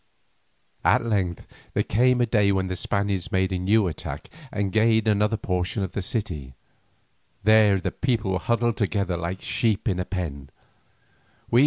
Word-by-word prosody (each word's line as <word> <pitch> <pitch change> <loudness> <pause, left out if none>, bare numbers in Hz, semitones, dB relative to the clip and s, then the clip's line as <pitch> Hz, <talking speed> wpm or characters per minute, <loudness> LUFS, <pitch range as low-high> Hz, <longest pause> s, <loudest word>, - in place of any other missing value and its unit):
At - - +3
length 95 -6 -1 0.3
there - - +2
came 125 +3 +3
a - - +4
day 105 -3 +3
when 95 -1 0
the 95 - -2
Spaniards 100 0 -2
made 95 0 +1
a 95 - -1
new 100 +2 +3
attack 80 - -6 0.2
and 100 -2 -1
gained 110 0 +3
another 105 +1 +2
portion 90 +1 -2
of 95 - -4
the 100 - -3
city. 85 - -4 0.9
There 105 -2 +5
the - - -2
people 115 -6 -1
were 95 - 0
huddled 120 +1 0
together 100 -2 0
like 85 +2 -4
sheep 110 0 0
in 95 -4 0
a 90 - -1
pen. 75 -8 -5
100 Hz, 160 wpm, -25 LUFS, 90-110 Hz, 0.9 s, There